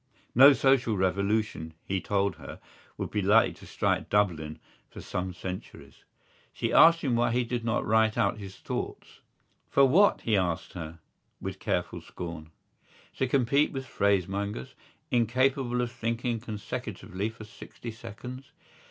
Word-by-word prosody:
No 135 +4 +9
social 135 -5 +2
revolution, 100 -3 0
he 95 -1 -1
told 100 -1 0
her, - - -10 0.4
would - - -4
be 105 - 0
likely 105 +4 +4
to - - -14
strike - - -1
Dublin 85 -7 0 0.3
for - - -11
some 90 0 -4
centuries. 90 +1 -9 0.5
She - - -2
asked 165 0 +7
him 130 -5 0
why 120 0 +2
did 120 -1 -1
he 120 - +1
not 115 0 -1
write 110 0 +3
out - - +1
his 95 -2 -8
thoughts. - - -6 0.5
For 140 - +5
what, 185 +10 +4
he 110 - +1
asked 90 -4 -1
her, 85 -2 -7 0.4
with - - -6
careful - - -2
scorn. 85 -3 -8 0.7
To 130 - +1
compete 140 +3 +2
with 135 -1 -4
phrasemongers, 100 - -1 0.4
incapable 125 +1 +1
of 120 -1 -2
thinking 115 +1 -2
consecutively 110 -2 -5
for 110 0 -11
sixty 110 +2 -10
seconds? 120 +4 -9
110 Hz, 145 wpm, -28 LUFS, 95-125 Hz, 0.7 s, No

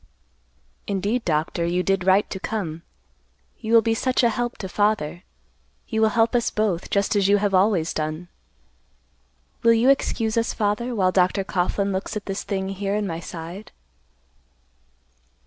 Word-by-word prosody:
"Indeed, 205 +5 -1
Doctor, 165 +1 0
you 175 +2 0
did 195 -1 0
right 190 +2 +4
to 190 - -4
come. 175 -7 -4 0.8
You 225 +1 +1
will 225 - +7
be 225 - +1
such 255 +3 +1
a 235 - +4
help 240 +2 -3
to 190 - -5
father. 200 -5 0 0.7
You 220 -2 0
will 220 - +5
help 225 +2 +2
us 240 -1 +2
both, 205 -5 -1
just 200 +1 +1
as 200 -2 +3
you 205 +1 +5
have 200 -1 0
always 185 -3 +2
done. 155 +3 -3 1.3
Will 230 0 +5
you 235 +4 +5
excuse 225 -5 0
us, 230 0 0
father, 220 +3 -1
while 185 -3 +2
Dr. 185 +1 +2
Coughlan 195 +1 -1
looks 190 +2 -3
at 205 - -7
this 195 0 -3
thing 190 -2 -3
here 195 +1 -2
in 210 0 -1
my 165 -4 -4
side?" 170 +4 -8
200 Hz, 165 wpm, -23 LUFS, 185-220 Hz, 1.3 s, will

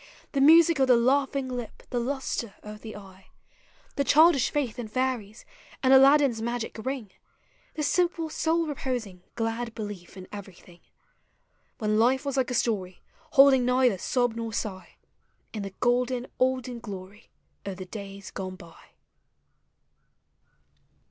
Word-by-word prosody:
The 275 - 0
music 325 +1 +6
of 265 - +4
the 250 -2 +6
laughing 270 +2 +1
lip, 245 -3 -6
the 245 - 0
lustre 245 -4 -3
of 210 0 -9
the 220 - -8
eye; 190 -2 -13 0.7
The 280 - +2
childish 300 -2 +5
faith 265 -6 -2
in 235 - -4
fairies, 235 -3 -3 0.4
ami 260 0 +5
Aladdin's 270 -3 +6
magic 235 0 -3
ring— 260 -7 -4 0.6
The 305 - -2
simple, 340 +1 +1
soul 325 +2 0
reposing, 245 - -4
glad 225 0 -3
belief 205 -5 -7
in 185 0 -9
every 200 -3 -9
thing,— 175 -1 -18 1.0
When 215 -1 0
life 260 +4 +3
was 280 -1 -2
like 265 -1 +1
a 250 - -2
story, 190 -6 -1 0.3
holding 270 -2 +7
neither 250 -5 +2
sob 245 +3 0
nor 230 -1 -4
sigh. 190 -3 -5 0.6
In 215 - -4
the 195 -1 -7
golden 245 0 +1
olden 255 -1 0
glory 200 -1 -10 0.3
of 195 -2 -6
the 185 - -7
days 200 0 -9
gone 185 -1 -6
by. 170 -3 -15
240 Hz, 140 wpm, -27 LUFS, 205-265 Hz, 1.0 s, holding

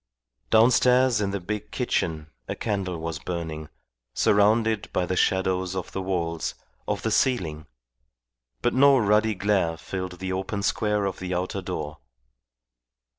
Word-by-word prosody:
Downstairs 125 +1 +4
in 100 - 0
the 100 0 -2
big 105 +4 -5
kitchen 80 -1 -2 0.2
a - - -3
candle 100 -5 -2
was 80 -1 -4
burning, 80 -3 -5 0.5
surrounded 110 +1 +3
by 90 - 0
the 95 - -2
shadows 95 0 +1
of 95 - -4
the 95 - -3
walls, 85 -3 -2 0.3
of - - -2
the - - 0
ceiling, 80 - 0 1.0
but - - +2
no 140 +1 +6
ruddy 105 -1 +3
glare 95 -4 +1
filled 90 +4 -5
the 95 +1 -3
open 95 +2 -3
square 105 0 +1
of 95 - -3
the 90 -1 -3
outer 90 +2 -2
door. 80 -5 -5
95 Hz, 140 wpm, -25 LUFS, 85-105 Hz, 1.0 s, no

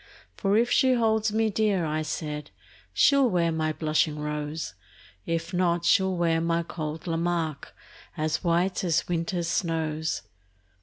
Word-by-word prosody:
For 200 +1 +1
if 240 +2 +2
she 260 0 +4
holds 220 -2 +2
me 220 0 +1
dear, 205 -5 +1
I 155 0 -1
said, 150 -1 -4 0.4
She'll 280 -3 +4
wear 170 -3 +1
my 155 -1 0
blushing 155 -1 0
rose; 150 - -4 0.5
If 165 +2 -2
not, 175 -1 +1
she'll 190 -1 +3
wear 165 -1 +2
my 170 0 +1
cold 155 -1 -5
Lamarque, 165 -3 -2 0.5
As 155 +3 -1
white 175 +3 +1
as 165 -3 +1
winter's 170 0 -1
snows. 160 -2 -1
170 Hz, 140 wpm, -26 LUFS, 155-190 Hz, 0.5 s, she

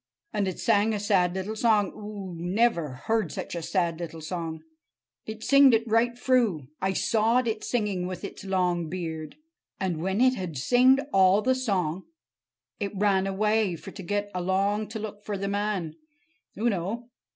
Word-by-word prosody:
And 205 -2 0
it 185 - -3
sang 220 0 +2
a - - -2
sad 190 -3 +2
little 190 +3 -3
song. 215 -3 +2
Oo 205 -3 -7
never 170 - 0
heard 225 -1 +1
such 190 - -5
a 170 - -3
sad 170 0 -1
little 165 -1 -6
song! 160 -1 -5 0.6
It 220 0 -7
singed 275 -3 +6
it 225 - +1
right 235 +2 +2
froo. 230 - +1
I 190 0 +1
sawed 230 +5 +2
it 215 -1 -2
singing 205 -6 -1
with 185 -1 -6
its - - -7
long 180 -4 0
beard. 160 -3 -5 0.4
And 180 -5 -2
when 190 +4 -1
it 255 +1 +5
had 180 - -5
singed 250 - +4
all 195 +2 +5
the 260 - +3
song, 190 -9 -1 0.7
it 200 -2 -3
ran 195 -1 +2
away—for 210 -2 0
to 200 - -9
get 205 +3 -2
along 195 +4 0
to 220 - -6
look 210 -1 -7
for 205 -1 -3
the 200 +1 -3
man, 200 -5 -1 0.6
oo 225 +4 +1
know. 225 +4 -2
200 Hz, 170 wpm, -27 LUFS, 180-220 Hz, 0.7 s, singed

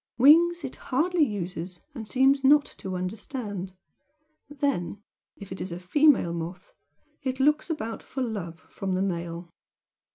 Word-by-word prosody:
wings 335 +6 +6
it 270 - -5
hardly 330 +5 +1
uses 180 - -3
and 225 -6 -7
seems 270 +3 +3
not 290 +2 +6
to 190 -1 -7
understand 205 - -5 0.8
then, 275 -10 -1 0.4
if 200 -2 -11
it 190 - -5
is 185 - -4
a 170 - -5
female 255 - +4
moth, 170 +2 -6 0.5
it 260 -1 -3
looks 300 +4 +3
about 230 -8 -3
for 265 - -4
'love' 185 -8 -5
from 190 -1 -4
the 185 - 0
male. 170 -2 -4
220 Hz, 140 wpm, -27 LUFS, 180-280 Hz, 0.8 s, wings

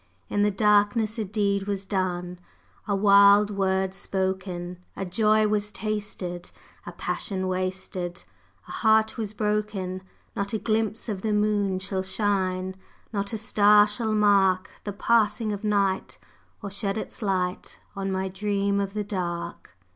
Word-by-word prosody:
In 205 - 0
the 205 - +4
darkness 210 +2 +2
a - - 0
deed 200 -1 0
was 200 -1 -2
done, 180 -2 -2 0.5
A 200 - +1
wild 200 +1 +6
word 190 -1 0
spoken! 190 -2 -3 0.2
A 195 - -4
joy 215 +3 +3
was 210 0 -1
tasted, 205 -5 -4 0.4
a - - -4
passion 190 -4 -3
wasted, 185 -1 -3 0.4
A - - -9
heart 220 0 +3
was 215 -2 -3
broken! 210 -3 -2 0.3
Not 200 -1 -3
a - - +2
glimpse 220 +1 -1
of 205 -4 -3
the 215 0 0
moon 210 -2 +1
shall 190 0 -2
shine, 190 -1 -1 0.4
Not 200 -1 -2
a 225 - -2
star 210 -1 +5
shall 215 +1 -1
mark 195 -2 +3
The 205 - -3
passing 225 +1 +2
of 205 +1 -5
night, 200 -2 0 0.5
or 200 - -5
shed 200 0 -1
its 220 - -6
light 185 -3 -2 0.2
On 195 -1 -2
my 190 0 -1
Dream 200 +1 0
of 200 0 -3
the 210 - -1
Dark! 175 - -5
200 Hz, 145 wpm, -26 LUFS, 190-210 Hz, 0.5 s, wild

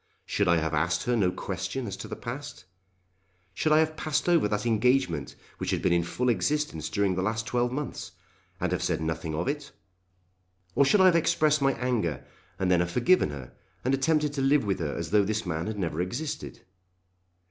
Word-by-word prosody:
Should 100 - 0
I 85 -1 +4
have 80 0 -1
asked 80 +3 +1
her 125 - +1
no 100 -5 +3
question 130 +7 -4
as 100 -3 -4
to - - -7
the - - -5
past? 125 -4 -7 0.9
Should 155 - 0
I 155 - +6
have 155 0 +2
passed 155 +1 -1
over 170 -10 +4
that 105 +1 -2
engagement 115 - +1 0.2
which - - -3
had - - -1
been - - +3
in 85 - +3
full 125 +9 -2
existence 115 - 0
during 100 -2 +1
the 95 - -1
last 110 +2 -1
twelve 120 0 0
months, 145 +3 -5 0.5
and - - -1
have - - -1
said - - 0
nothing 80 0 -3
of 85 +3 -2
it? 145 0 -3 1.0
Or 140 - +4
should 195 +8 +4
I - - +7
have 180 -2 +6
expressed 155 -2 +3
my 135 0 +3
anger 115 - -1 0.3
and 95 -1 0
then 90 - +4
have 90 0 0
forgiven 125 - +3
her, 70 -4 -8 0.3
and 130 - +2
attempted 150 +2 +1
to 140 - -2
live 135 -2 +3
with 100 -2 -1
her 75 -4 -2
as 85 0 -4
though 105 -1 +5
this 110 +2 -2
man 85 0 -2
had 110 -1 -4
never 85 -4 -2
existed? 125 - -4
110 Hz, 205 wpm, -27 LUFS, 85-140 Hz, 1.0 s, I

